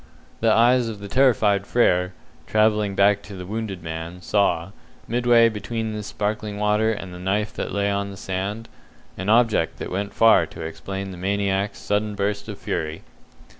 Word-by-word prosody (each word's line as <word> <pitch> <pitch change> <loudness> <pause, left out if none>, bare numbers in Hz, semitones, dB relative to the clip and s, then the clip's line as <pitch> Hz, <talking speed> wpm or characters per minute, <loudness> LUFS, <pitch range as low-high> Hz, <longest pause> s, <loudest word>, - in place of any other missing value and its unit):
The 115 -1 +3
eyes 120 +2 +4
of 110 -2 -6
the 100 - -7
terrified 105 -5 +3
Frere, 90 -6 +2 0.3
travelling 105 -2 +2
back 100 +1 +4
to 100 -1 -10
the 90 -1 -7
wounded 100 -3 -5
man, 80 +2 -6
saw, 90 -2 +1 0.4
midway 120 0 +4
between 110 +1 -3
this 105 -1 -5
sparkling 105 0 -3
water 105 +1 +2
and 95 -4 -6
the 90 - -9
knife 100 +3 -1
that - - -4
lay 100 0 0
on 100 0 -1
the 100 - -9
sand, 100 +4 -4 0.5
an 95 +2 -4
object 110 -8 +3
that - - -6
went 100 +2 -2
far 115 -1 +5
to - - -10
explain 95 +5 -6
the 90 - -9
maniac's 100 +1 -1
sudden 105 0 -1
burst 100 +1 -2
of - - -6
fury. 80 +1 -4
100 Hz, 170 wpm, -23 LUFS, 95-110 Hz, 0.5 s, far